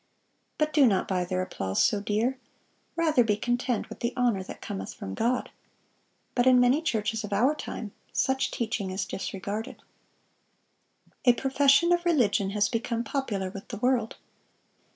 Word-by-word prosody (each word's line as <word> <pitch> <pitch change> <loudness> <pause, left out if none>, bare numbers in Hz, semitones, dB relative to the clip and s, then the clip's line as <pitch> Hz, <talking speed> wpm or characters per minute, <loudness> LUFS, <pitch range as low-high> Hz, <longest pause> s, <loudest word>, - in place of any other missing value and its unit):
But 305 0 0
do 285 -3 +6
not 195 -4 +1
buy 180 -2 0
their 185 0 -1
applause 95 - -1
so 205 - +2
dear. 225 +6 0 0.6
Rather 315 -7 +3
be 210 -2 +1
content 245 +1 -1
with - - -10
the 235 +1 -2
honor 240 -6 +2
that 185 - -9
cometh 95 0 -6
from 95 - -6
God."(638) 245 - 0 0.8
But 245 0 +2
in 255 -1 +7
many 250 +5 +4
churches 220 -6 -1
of 210 - -6
our 240 +9 +3
time, 225 -7 -6 0.2
such 265 0 +1
teaching 225 -4 -2
is 190 +1 -2
disregarded. 200 +4 -5 1.4
A 245 - +7
profession 275 +6 +3
of 345 0 +3
religion 235 - +2
has 205 0 +1
become 235 0 -2
popular 225 -9 -2
with 195 +1 -9
the 220 - -6
world. 245 -1 +1
235 Hz, 155 wpm, -27 LUFS, 200-260 Hz, 1.4 s, in